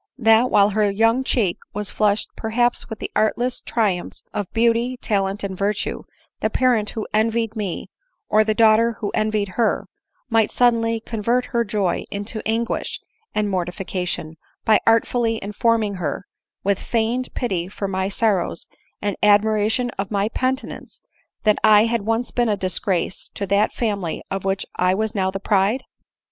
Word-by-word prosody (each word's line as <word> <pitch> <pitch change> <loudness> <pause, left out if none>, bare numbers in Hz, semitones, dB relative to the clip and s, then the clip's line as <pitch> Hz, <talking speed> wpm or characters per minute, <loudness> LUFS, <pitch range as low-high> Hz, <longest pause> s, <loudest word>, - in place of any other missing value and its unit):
— - - -59
that, 225 0 +4
while 205 -1 +5
her 210 0 +2
young 225 +5 +2
cheek 215 -9 0 0.2
was 210 -1 -2
flushed 210 0 +1
perhaps 240 +3 0
with 220 - -5
the - - -6
artless 240 +3 +1
triumphs 200 -6 -1
of 205 -3 -3
beauty, 235 +2 +1
talent, 200 -3 -1
and 195 -1 -3
virtue, 200 +2 -1 0.4
the - - 0
parent 240 -5 +2
who 220 - -5
envied 225 +1 +1
me, 205 -5 -4 0.4
or 215 +1 +4
the 215 0 0
daughter 225 +1 +5
who 210 -2 -4
envied 215 -2 0
her, 225 +4 0 0.4
might 225 -2 +3
suddenly 230 -2 +2
convert 230 +2 -1
her 235 0 +3
joy 205 -4 -1
into 205 +2 -5
anguish 230 +1 -1 0.4
and 210 -1 +1
mortification, 180 -3 -3 0.3
by 220 -2 +5
artfully 230 0 +2
informing 215 +1 +1
her, 180 -1 -3 0.4
with 200 0 +1
feigned 235 +2 -1
fity 185 -8 -1
for 200 +1 -4
my 190 0 -1
sorrows 200 -5 0 0.4
and 205 -1 0
admiration 215 +3 +3
of 195 0 -2
my 205 0 0
penitence, 260 +3 -3 0.4
that 215 -2 +3
had 220 +2 +5
once 225 +3 -1
been 240 -2 +1
a 205 - +1
disgrace 185 -1 -1
to 200 - -2
that 200 +2 +2
family 200 -8 -2
of 195 0 -3
which 195 +1 0
I 180 +1 +3
was 220 +2 -1
now 190 -3 0
the 195 +1 -4
pride 205 +5 +1
215 Hz, 155 wpm, -22 LUFS, 200-230 Hz, 0.4 s, while